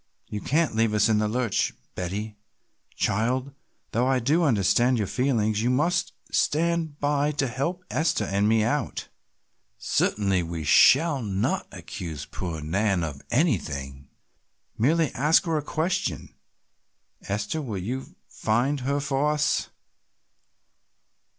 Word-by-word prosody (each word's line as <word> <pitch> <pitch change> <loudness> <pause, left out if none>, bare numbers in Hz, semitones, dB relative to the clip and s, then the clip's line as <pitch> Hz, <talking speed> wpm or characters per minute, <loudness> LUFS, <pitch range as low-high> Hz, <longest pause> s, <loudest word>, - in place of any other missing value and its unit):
"You 105 - -6
can't 155 -2 +1
leave 110 -1 +2
us 105 - +3
in 110 -1 +3
the 105 - +1
lurch, 120 -1 0 0.2
Betty, 105 +4 -4 0.6
child, 125 +6 0 0.4
though 120 +3 +1
I 135 0 +3
do 140 +8 +2
understand 120 - +3
your 105 - 0
feelings, 110 -3 0
you 120 - +1
must 170 +8 +1 0.2
stand 165 -1 0
by 145 0 +1
to 140 -2 0
help 140 +9 -3
Esther 160 +1 +1
and 100 +2 +1
me 110 -1 +3
out. 115 - -2 0.7
Certainly 100 -3 +1
we 85 -1 -5
shall 140 - +5
not 100 -3 -1
accuse 80 -5 -7
poor 85 -2 -5
Nan 95 +3 0
of 70 -4 -5
anything, 70 - -1 0.7
merely 155 +5 +2
ask 150 +7 +3
her 165 -2 0
a 150 - +1
question. 160 +4 -2 1.0
Esther, 105 +10 -2
will 115 -8 -4
you 125 +9 -5
find 125 +6 0
her 140 +3 -1
for 140 +1 0
us?" 150 0 0
120 Hz, 130 wpm, -25 LUFS, 100-145 Hz, 1.0 s, shall